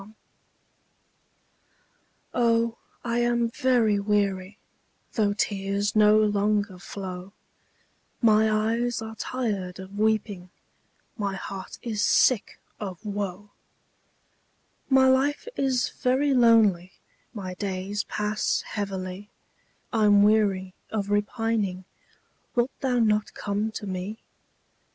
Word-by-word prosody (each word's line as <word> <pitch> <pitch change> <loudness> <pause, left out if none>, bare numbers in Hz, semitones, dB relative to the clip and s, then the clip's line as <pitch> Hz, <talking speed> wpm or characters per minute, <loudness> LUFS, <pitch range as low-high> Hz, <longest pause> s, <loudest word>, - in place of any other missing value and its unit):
APPEAL. 215 +2 -15 2.2
Oh, 230 -1 +2 0.3
I 235 0 0
am 240 -1 +1
very 235 -5 +2
weary, 200 -1 0 0.6
Though 210 -3 +2
tears 200 0 -1
no 210 0 +6
longer 205 -2 +1
flow; 185 0 -7 0.9
My 220 -2 +4
eyes 225 +2 0
are 220 0 -7
tired 210 -7 -3
of 190 +2 -8
weeping, 210 -4 0 0.7
My 200 -3 -2
heart 195 0 -7
is 215 -3 -1
sick 245 -5 +3 0.2
of 195 -1 -7
woe; 205 -1 -4 1.4
My 265 -1 +5
life 270 - +2
is 260 -2 +1
very 270 +2 +1
lonely 220 -7 +4 0.4
My 190 -5 -6
days 195 +1 -3
pass 210 0 -1
heavily, 195 -1 -5 0.6
I'm 205 -2 +5
weary 200 -3 +2 0.2
of 205 -2 -3
repining; 205 -3 -1 0.7
Wilt 245 +2 +2
thou 255 -2 0
not 215 -2 +1
come 205 +2 -2
to 210 - -5
me? 190 +3 -5
210 Hz, 100 wpm, -26 LUFS, 195-230 Hz, 2.2 s, no